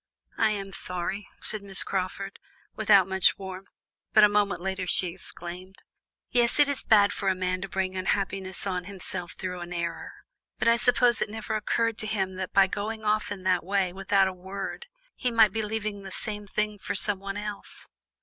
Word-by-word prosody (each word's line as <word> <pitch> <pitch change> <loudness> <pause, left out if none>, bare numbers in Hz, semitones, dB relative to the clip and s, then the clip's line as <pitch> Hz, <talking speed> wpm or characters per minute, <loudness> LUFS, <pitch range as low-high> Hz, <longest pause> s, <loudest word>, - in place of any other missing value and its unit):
"I 220 - +5
am 200 -2 -3
sorry," 190 +2 -3
said 215 - -3
Miss 195 -1 +4
Crawford, 195 +1 -3 0.4
without 205 -3 +5
much 190 -1 +3
warmth, 190 0 -8 0.4
but 215 - +7
a - - +10
moment 205 -3 +1
later 190 0 -3
she 180 0 +2
exclaimed: 180 +1 -9 0.6
"Yes, 240 -1 +3
it 290 - +7
is 285 -2 -1
bad 205 -3 +5
for 195 - -1
a 190 - +2
man 185 0 -1
to 195 - -5
bring 190 0 -2
unhappiness 190 0 -2
on 180 -2 -2
himself 180 -2 -4
through 180 -1 -5
an 175 0 -7
error, 170 -1 -4 0.4
but - - 0
I 230 0 +6
suppose 245 -1 +3
it - - 0
never 220 0 -5
occurred 225 +1 0
to 215 - -3
him 195 -3 -1
that 185 -1 -4
by 195 -1 +6
going 215 +3 -4
off 210 0 +1
in 195 -2 -5
that 185 -2 +2
way, 190 -1 0
without 195 0 +3
a 190 - -3
word, 195 - -6 0.3
he 250 - -1
might 225 -3 +5
be 225 - 0
leaving 215 -1 -3
the 195 - -8
same 210 +1 -5
thing 210 +1 -2
for 205 - -4
someone 195 0 0
else. 210 -1 -7
195 Hz, 190 wpm, -27 LUFS, 185-210 Hz, 0.6 s, a